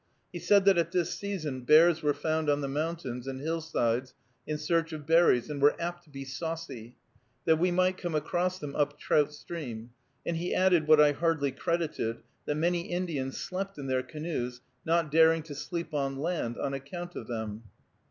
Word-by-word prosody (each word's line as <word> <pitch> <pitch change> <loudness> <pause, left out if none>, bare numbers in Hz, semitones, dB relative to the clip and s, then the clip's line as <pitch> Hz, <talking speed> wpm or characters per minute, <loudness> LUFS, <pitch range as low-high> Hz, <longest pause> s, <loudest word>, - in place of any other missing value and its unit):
He - - -4
said 200 -1 +4
that 195 -3 +6
at 170 0 0
this 180 -2 0
season 160 -10 -4
bears 160 +5 +6
were 150 -2 +1
found 160 -1 0
on 145 0 +2
the 140 - -2
mountains 140 -4 -3
and 135 -1 -4
hillsides 130 -6 -1 0.3
in 155 - -1
search 165 0 0
of 150 -2 -7
berries, 165 -6 +4
and 145 -2 -5
were 145 +1 +5
apt 175 0 -4
to - - -22
be 135 -1 -7
saucy, 135 -4 -6 0.5
that 160 -1 +4
we 180 +2 +3
might 185 +1 +2
come 175 -3 -3
across 180 +4 0
them 145 -4 -7
up 145 0 0
Trout 150 0 +2
Stream; 125 -7 -7 0.3
and 170 - -1
he 175 +2 -2
added, 180 -4 +3
what 155 -1 +7
I 150 -1 +7
hardly 160 -2 0
credited, 150 -6 -2 0.2
that 150 - 0
many 170 +2 0
Indians 165 -7 -2
slept 195 0 -4
in 140 - -6
their 130 -1 +1
canoes, 130 -4 -4 0.2
not 165 -2 +1
daring 160 0 +5
to 155 -2 -8
sleep 170 +3 -5
on 135 -2 -1
land, 150 -6 -2
on 140 - -2
account 175 +6 -6
of 110 - -6
them. 110 -1 -5
155 Hz, 190 wpm, -29 LUFS, 135-170 Hz, 0.5 s, what